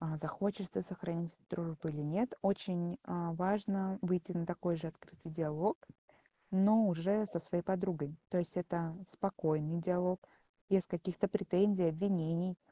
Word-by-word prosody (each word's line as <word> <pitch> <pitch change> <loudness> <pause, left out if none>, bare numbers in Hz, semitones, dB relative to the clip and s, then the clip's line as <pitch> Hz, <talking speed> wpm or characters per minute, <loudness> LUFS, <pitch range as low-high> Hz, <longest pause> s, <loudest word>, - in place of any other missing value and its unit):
э, 160 -1 -2
захочется 195 +5 -2
сохранить 170 -2 -4
дружбу 165 -1 -3
или 150 -1 -3
нет, 195 +12 0
очень, 185 -3 0
э, - - -10 0.3
важно 195 +2 +1
выйти 180 -1 0
на 170 -2 -1
такой 175 -1 0
же 165 +1 -5
открытый 160 +1 -12
диалог, 160 - +1 0.7
но 210 +3 +6
уже 195 +5 +2
со 175 - -2
своей 175 +1 -2
подругой. 180 -6 -1
То 185 - -1
есть 175 0 0
это 170 -2 -2 0.2
спокойный 165 -4 0
диалог 180 +1 +1 0.5
без 195 -3 +4
каких-то 180 +2 -1
претензий, 195 -2 +3
обвинений. 175 0 +1
180 Hz, 135 wpm, -36 LUFS, 165-195 Hz, 0.7 s, но